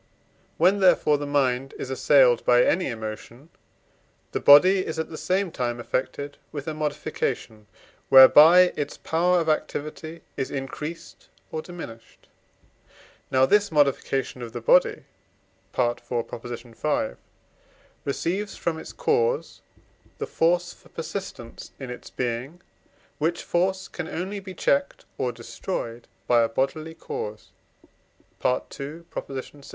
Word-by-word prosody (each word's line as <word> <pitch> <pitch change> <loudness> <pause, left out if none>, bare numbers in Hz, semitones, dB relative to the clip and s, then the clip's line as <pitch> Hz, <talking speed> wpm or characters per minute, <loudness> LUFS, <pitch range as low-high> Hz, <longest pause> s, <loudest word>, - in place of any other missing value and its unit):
When, 185 +5 +4
therefore, 155 -6 +4
the 145 - -4
mind 135 -2 0
is 130 - -5
assailed 130 -2 +4
by 125 0 +5
any 180 +1 +1
emotion, 115 +4 -7 0.8
the - - -1
body 185 +7 +7
is 160 - -5
at 160 0 -3
the - - -6
same 185 +1 0
time 120 -3 -2
affected 130 +4 -3
with 145 -1 -6
a 160 - -2
modification 145 -7 -3 0.4
whereby 160 +7 +9
its 145 -1 -4
power 175 +2 +2
of 165 - -2
activity 155 +1 -3
is 135 - -3
increased 150 +4 -7 0.2
or 160 - -3
diminished. 155 -11 -11 1.0
Now 130 0 +4
this 205 +6 +3
modification 135 -3 +1
of 115 -1 -7
the 120 - -4
body 150 +10 +3 0.7
(IV. 120 -1 +1
v.) 120 +2 -3 0.9
receives 185 +8 -2
from 160 -2 -2
its - - -9
cause 470 0 0 0.6
the - - -3
force 175 +1 +1
for - - -21
persistence 165 -8 -7
in 130 -3 -6
its 125 - -9
being; 125 +6 -4 0.6
which 165 +3 0
force 190 +2 0
can 175 -3 -6
only 190 +4 -4
be 190 -1 -9
checked 280 +10 0
or 125 - 0
destroyed 115 0 -6 0.2
by 120 +2 +4
a 115 - +2
bodily 155 +7 -2
cause 105 -7 -6 0.9
(II. 140 +5 -2 0.2
vi.) 135 +1 -8
145 Hz, 125 wpm, -25 LUFS, 125-175 Hz, 1.0 s, whereby